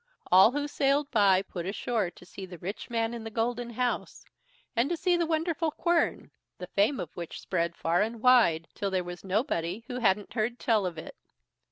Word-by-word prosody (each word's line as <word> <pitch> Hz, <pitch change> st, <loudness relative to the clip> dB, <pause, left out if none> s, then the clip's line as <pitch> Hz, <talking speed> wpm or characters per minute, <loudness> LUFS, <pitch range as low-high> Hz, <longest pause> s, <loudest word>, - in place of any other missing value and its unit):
All 190 Hz, +5 st, +8 dB
who 290 Hz, 0 st, -1 dB
sailed 285 Hz, 0 st, +1 dB
by 195 Hz, -4 st, +4 dB
put 180 Hz, -2 st, -6 dB
ashore 215 Hz, 0 st, -1 dB
to 180 Hz, -, -17 dB
see 190 Hz, +1 st, -9 dB
the 180 Hz, -1 st, -10 dB
rich 190 Hz, +9 st, -6 dB
man 230 Hz, -1 st, -1 dB
in 235 Hz, -1 st, -6 dB
the 225 Hz, -, -5 dB
golden 235 Hz, +2 st, -2 dB
house, 245 Hz, +1 st, -3 dB, 0.5 s
and 240 Hz, +5 st, +2 dB
to 345 Hz, -, -1 dB
see 355 Hz, +3 st, +2 dB
the 340 Hz, -1 st, 0 dB
wonderful 325 Hz, 0 st, 0 dB
quern, 340 Hz, +2 st, 0 dB, 0.3 s
the 180 Hz, -, -6 dB
fame 205 Hz, +8 st, +1 dB
of 165 Hz, -, -6 dB
which 170 Hz, -2 st, -6 dB
spread 170 Hz, -2 st, -1 dB
far 170 Hz, +3 st, +1 dB
and 225 Hz, +2 st, -2 dB
wide, 220 Hz, -10 st, +4 dB
till 200 Hz, -, -2 dB
there 185 Hz, -1 st, 0 dB
was 175 Hz, 0 st, -8 dB
nobody 195 Hz, -, -1 dB
who 250 Hz, +1 st, -5 dB
hadn't 205 Hz, -3 st, +1 dB
heard 235 Hz, +1 st, -1 dB
tell 215 Hz, -6 st, +1 dB
of 170 Hz, -2 st, -6 dB
it. 160 Hz, -, -8 dB
220 Hz, 200 wpm, -28 LUFS, 185-250 Hz, 0.5 s, All